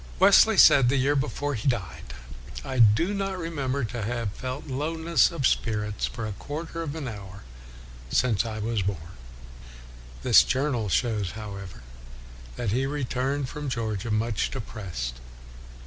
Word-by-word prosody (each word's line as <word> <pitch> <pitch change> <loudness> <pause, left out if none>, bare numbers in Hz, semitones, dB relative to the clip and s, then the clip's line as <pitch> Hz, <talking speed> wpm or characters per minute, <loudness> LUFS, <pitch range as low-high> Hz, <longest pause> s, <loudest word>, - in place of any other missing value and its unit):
Wesley - - +6
said, 130 -3 +7
the 135 - +2
year 140 +3 +2
before 145 +1 -1
he 115 +1 -3
died, 90 - -3 0.3
" - - -11
I 130 - -3
do 115 - +5
not 195 -1 -2
remember 140 -6 -2
to 115 0 -4
have 115 -1 -2
felt 130 +5 -5
lowness 160 +4 +1
of 165 -6 -2
spirits 105 -4 0
for 115 -3 -6
a 110 - -4
quarter 160 +9 -6
of 155 -2 -4
an 155 -4 -5
hour 100 -3 -9 0.7
since 115 - +2
I 110 -2 -5
was 110 0 -1
born. 95 0 -1
r 80 +2 -12 1.1
His - - +7
journal 130 -6 -1
shows, 105 -1 0
however, 100 - -8 0.7
that 115 -5 -2
he 130 +4 +1
returned 135 0 -2
from 145 +1 -5
Georgia 115 -3 -3
much 110 0 0
de 135 - -5
pressed. 75 - -6
120 Hz, 155 wpm, -26 LUFS, 105-140 Hz, 1.1 s, said